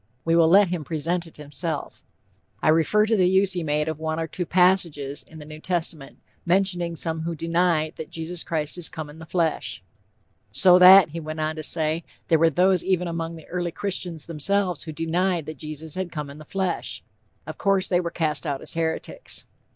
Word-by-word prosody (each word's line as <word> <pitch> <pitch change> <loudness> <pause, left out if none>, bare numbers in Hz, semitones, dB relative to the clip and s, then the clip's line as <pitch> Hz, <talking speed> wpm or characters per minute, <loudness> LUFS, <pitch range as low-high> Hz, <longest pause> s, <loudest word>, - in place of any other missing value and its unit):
We 165 0 +2
will 165 -1 +5
let 195 +2 +5
him 175 -3 -3
present 165 +3 -2
it 165 - -17
himself; 150 +1 -5 0.6
"I - - +1
refer 165 +7 +3
to 220 +1 +2
the 185 -3 +3
use 190 0 +3
he 175 -2 -2
made 150 0 0
of 160 -1 -3
one 160 0 -2
or 165 - -1
two 170 +2 -4
passages 170 -6 +2
in 160 - -15
the 150 - -10
New 155 0 -10
Testament, 165 -5 -4 0.3
mentioning 175 -2 +1
some 160 0 -2
who 165 +1 -3
deny 165 -1 +1
'that 160 - -8
Jesus 165 +1 -3
Christ 155 +1 -2
is 170 - -2
come 155 -2 -7
in 155 - -14
the 160 - -11
flesh.' 160 - -1 0.7
'So 180 -1 +7
that,' 185 -1 +9
he 165 +3 -6
went 155 0 -6
on 155 0 -1
to 155 - -5
say, 160 +1 +1 0.3
'there 160 - +4
were 165 +1 +5
those 180 +3 +2
even 180 -2 0
among 165 0 -4
the 160 - -12
early 175 -1 -3
Christians 180 -4 -4
themselves 180 +2 -1
who 160 - -6
denied 170 +2 -1
that 155 -3 -8
Jesus 155 0 -5
had 185 -1 -3
come 150 -3 -5
in 145 - -12
the 155 - -11
flesh. 190 +1 -3 0.4
Of - - -8
course, 195 -2 +2
they 175 - +2
were 170 -1 -2
cast 160 -2 -1
out 140 -2 -3
as - - -1
heretics.' 165 -1 -3
165 Hz, 205 wpm, -24 LUFS, 155-180 Hz, 0.7 s, that